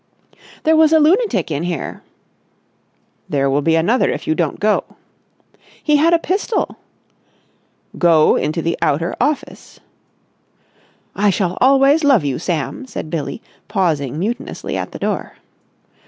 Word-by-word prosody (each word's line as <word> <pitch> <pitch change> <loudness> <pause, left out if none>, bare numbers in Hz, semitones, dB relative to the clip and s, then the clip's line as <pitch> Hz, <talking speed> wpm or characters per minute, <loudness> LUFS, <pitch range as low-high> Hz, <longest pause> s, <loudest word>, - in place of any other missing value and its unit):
"There 320 +1 +4
was 315 -1 +5
a 320 - +6
lunatic 370 - +2
in 145 0 -2
here...." 170 -4 -4 1.3
"There 140 -1 +1
will 140 +2 +1
be 160 +2 +2
another 185 +11 +2
if - - -4
you 155 - +1
don't 160 -2 -2
go." 210 +1 +2 1.0
"He 300 -1 +3
had 320 +3 +3
a 340 - +5
pistol." 385 +6 -2 1.2
"Go 165 -3 +4
into 155 +2 -1
the 170 - 0
outer 165 +5 0
office!" 290 +3 -3 1.4
"I 205 +1 +2
shall 185 -2 0
always 275 +4 +4
love 270 - +4
you, 135 -2 -2
Sam!" 175 - -3
said 155 - -7
Billie, 170 +7 -4 0.2
pausing 160 - -1
mutinously 220 +8 -4
at - - -4
the - - -7
door. - - -3
190 Hz, 135 wpm, -18 LUFS, -, 1.4 s, a